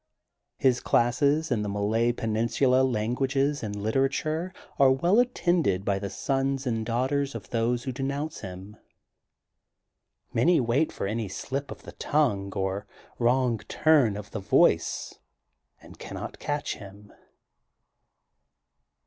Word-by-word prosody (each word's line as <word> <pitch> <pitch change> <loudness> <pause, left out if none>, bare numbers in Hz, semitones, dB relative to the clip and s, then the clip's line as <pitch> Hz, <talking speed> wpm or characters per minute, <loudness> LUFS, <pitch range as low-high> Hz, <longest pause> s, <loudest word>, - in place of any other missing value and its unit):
His 130 -2 +3
classes 140 +6 +2
in 115 -3 +1
the 105 - -2
Malay 110 +4 +1
Peninsula 115 +3 +1
languages 130 +4 0
and 105 -2 -4
literature 135 - -1 0.3
are 135 -1 +7
well 170 - +3
attended 175 - +1
by 100 -1 +1
the 100 0 -4
sons 135 +2 -1
and 115 -3 -1
daughters 130 +4 -1
of 100 -5 -8
those 120 +1 0
who 130 - -3
denounce 140 +4 -3
him. 95 +2 -9 1.6
Many 165 +9 +4
wait 130 +5 +1
for - - -4
any 110 +2 -2
sHp 135 +8 -4
of - - -9
the - - -9
tongue 105 -10 0
or 95 +1 -2 0.3
wrong 120 -1 +2
turn 140 -10 +3
of 105 -1 -9
the 110 - -4
voice 95 - +2 0.6
and - - -14
cannot - - -7
catch 145 0 -3
him. 100 0 -13
120 Hz, 125 wpm, -27 LUFS, 105-140 Hz, 1.6 s, are